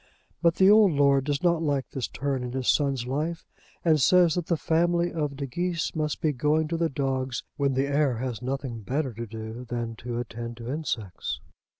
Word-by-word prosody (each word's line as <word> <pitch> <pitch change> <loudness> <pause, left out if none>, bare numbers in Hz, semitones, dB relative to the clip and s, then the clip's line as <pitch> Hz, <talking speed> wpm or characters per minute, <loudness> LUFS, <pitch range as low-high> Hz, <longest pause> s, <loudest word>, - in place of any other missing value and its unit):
But 170 -1 +4
the 190 - +5
old 205 -3 +7
lord 140 -1 +4
does 145 +1 -1
not 170 -2 +3
like 145 -4 -1
this 130 -3 -3
turn 135 -1 -2
in 125 0 -5
his 130 -1 -2
son's 135 -4 +2
life, 155 +6 -2 0.4
and 155 -3 +4
says 175 +3 +5
that 175 -1 -2
the 170 - +1
family 170 +2 +1
of 150 -4 -2
De 140 0 -4
Geese 170 +5 -2
must 150 -1 -1
be 155 - +2
going 150 +4 +1
to 165 - -1
the 165 0 +1
dogs 130 -3 -2
when 140 -2 +1
the 135 +1 +2
heir 140 -3 +1
has 125 -1 -4
nothing 130 -2 -3
better 130 +4 -2
to 115 +2 -6
do 110 +2 -7
than 120 -2 -4
to 120 0 -5
attend 120 0 -5
to 120 +1 -5
insects. 115 - -3
140 Hz, 205 wpm, -27 LUFS, 125-160 Hz, 0.4 s, old